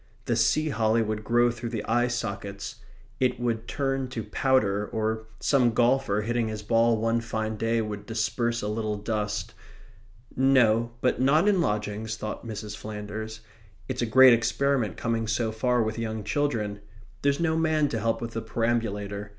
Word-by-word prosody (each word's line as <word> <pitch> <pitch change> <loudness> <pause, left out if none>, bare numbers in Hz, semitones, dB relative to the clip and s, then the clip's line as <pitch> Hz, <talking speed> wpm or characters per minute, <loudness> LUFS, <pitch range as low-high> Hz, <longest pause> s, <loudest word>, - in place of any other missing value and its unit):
The 120 - +1
sea 155 +7 +2
holly 115 -3 +2
would 110 0 -3
grow 120 +2 +3
through 120 0 -6
the 115 -2 -4
eye 120 +2 +2
sockets; 100 -1 -4 0.4
it 125 -2 +1
would 115 -1 -2
turn 135 -1 -1
to 120 -3 -5
powder, 105 -7 +1
or 110 0 -2
some 125 -5 +3
golfer, 120 -3 +2
hitting 120 +1 0
his 110 -1 -5
ball 115 +1 +3
one 115 +1 +1
fine 110 -1 -3
day, 115 +1 0
would 105 -1 -6
disperse 120 +1 -1
a - - -1
little 105 0 -2
dust 105 -2 -3 0.8
No, 120 -4 +4
but 125 - +1
not 155 +8 +4
in 195 -4 +4
lodgings, 105 -2 -2
thought 105 -1 -6
Mrs. 105 -2 -6
Flanders. 110 +1 -6 0.5
It's 130 -1 -3
a 120 - 0
great 130 +2 +8
experiment 120 -1 +1
coming 115 -1 -1
so 110 +1 0
far 120 +2 +1
with 110 +1 -3
young 110 -1 -3
children. 105 -3 -1 0.4
There's 140 +1 +1
no 160 -1 +1
man 155 -2 +2
to 115 - -2
help 115 +2 0
with 115 - -4
the 115 - -3
perambulator. 105 -3 -2
115 Hz, 165 wpm, -27 LUFS, 110-120 Hz, 0.8 s, great